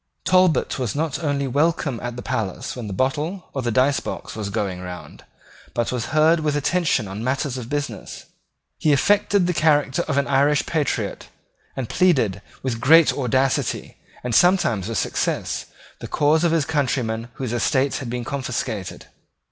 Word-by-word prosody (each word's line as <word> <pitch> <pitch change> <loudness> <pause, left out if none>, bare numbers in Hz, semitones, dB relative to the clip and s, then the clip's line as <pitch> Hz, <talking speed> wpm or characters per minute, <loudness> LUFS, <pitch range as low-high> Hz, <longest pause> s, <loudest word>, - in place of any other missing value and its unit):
Talbot 185 -6 +3
was 125 -3 -2
not 155 +1 -2
only 140 -2 0
welcome 145 -2 0
at 120 -1 -4
the 125 - -7
palace 115 -7 -3
when 120 -4 -6
the - - -5
bottle 150 - -2
or 135 - -2
the 120 - -1
dicebox 130 +5 0
was 105 -2 -4
going 100 -3 -2
round, 90 -1 -9 0.5
but 120 -1 0
was 125 -2 -2
heard 160 +2 +4
with 150 -2 0
attention 145 - +1
on 100 +4 -6
matters 135 +1 -1
of 125 -2 -6
business. 140 -7 -4 0.5
He 150 - +3
affected 200 +5 +3
the 180 - 0
character 145 -4 +2
of 140 -3 -1
an 140 - +2
Irish 140 +1 +2
patriot, 155 -3 -2 0.5
and 130 -3 -3
pleaded, 125 - +2 0.2
with 120 -3 -2
great 160 +5 +6
audacity, 130 0 0 0.3
and 125 -1 -3
sometimes 120 - +3
with 115 -2 -2
success, - - -1 0.3
the - - -7
cause 155 +3 +2
of 170 - +3
his 165 -3 +2
countrymen 125 -7 -1
whose 125 -3 -4
estates 135 +3 +1
had 130 -4 -6
been 120 0 -3
confiscated. 125 -7 -4
135 Hz, 165 wpm, -22 LUFS, 120-155 Hz, 0.5 s, great